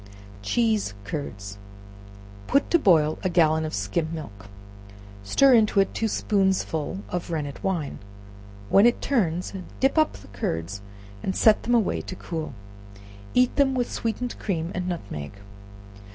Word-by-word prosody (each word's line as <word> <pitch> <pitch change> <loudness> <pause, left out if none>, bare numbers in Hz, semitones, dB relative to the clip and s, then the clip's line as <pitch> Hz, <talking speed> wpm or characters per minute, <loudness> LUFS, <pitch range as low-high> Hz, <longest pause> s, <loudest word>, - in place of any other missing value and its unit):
Cheese 215 - +1
Curds. 100 -4 -6 0.9
Put 280 - +2
to 340 - +5
boil 160 - +4
a 185 - 0
gallon 160 -2 +3
of 155 - -5
skim 100 - -1
milk, 105 -12 -8 0.8
stir 270 - +5
into 215 -3 +4
it 195 - +2
two 225 - 0
spoonsful 190 -4 0
of 175 -1 -4
rennet 150 -4 -4
wine; 175 -7 -2 0.7
when 200 +4 +6
it 240 - +2
turns, 180 - 0 0.3
dip 270 +4 +3
up 310 - +3
the 95 - -13
curds 100 0 -3 0.4
and 190 - -2
set 215 -2 +5
them 240 - +1
away 225 -5 +1
to 185 - -7
cool; 160 -7 -5 0.8
eat 250 0 +4
them 270 -2 +3
with 245 -1 -1
sweetened 235 +2 -3
cream 170 -4 -2
and 180 0 -2
nutmeg. 100 - -5
175 Hz, 140 wpm, -25 LUFS, 145-220 Hz, 0.9 s, when